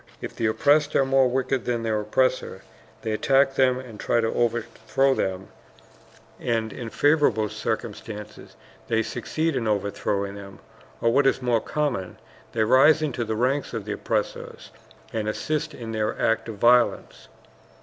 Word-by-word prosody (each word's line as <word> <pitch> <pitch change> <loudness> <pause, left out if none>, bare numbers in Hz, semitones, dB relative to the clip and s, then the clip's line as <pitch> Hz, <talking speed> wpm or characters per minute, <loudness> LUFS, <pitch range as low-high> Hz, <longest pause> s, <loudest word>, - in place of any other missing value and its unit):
If - - -7
the 115 - 0
oppressed 145 +6 +2
are 135 - +4
more 135 -1 +4
wicked 130 0 -1
than 120 -2 -1
their 110 -2 0
oppressors, 130 +5 0 0.4
they 110 - -2
attack 135 +5 +3
them 130 -1 +3
and 125 -5 -9
try 120 - +1
to 115 -1 0
overthrow 120 +3 0
them; 95 -4 -3 0.9
and 115 -2 -1
in 115 -2 -6
favorable 135 -7 +2
circumstances 105 +1 -6 0.3
they 115 0 +1
succeed 155 +8 -2
in 120 -3 -1
overthrowing 100 -1 -1
them, 100 -1 -10 0.4
or 115 0 +2
what 140 +1 +4
is - - +2
more 120 -3 +1
common, 130 -12 -2 0.4
they 110 - +2
rise 135 +7 +5
into 130 -5 -2
the 110 -1 -3
ranks 130 +3 0
of 110 -3 -4
the 105 - -4
oppressors 105 0 -3 0.4
and 110 -1 -1
assist 150 +7 -2
in 115 -2 -7
their 110 -1 -2
acts 115 +1 +1
of 110 - -5
violence. 120 +3 +2
115 Hz, 155 wpm, -24 LUFS, 110-135 Hz, 0.9 s, rise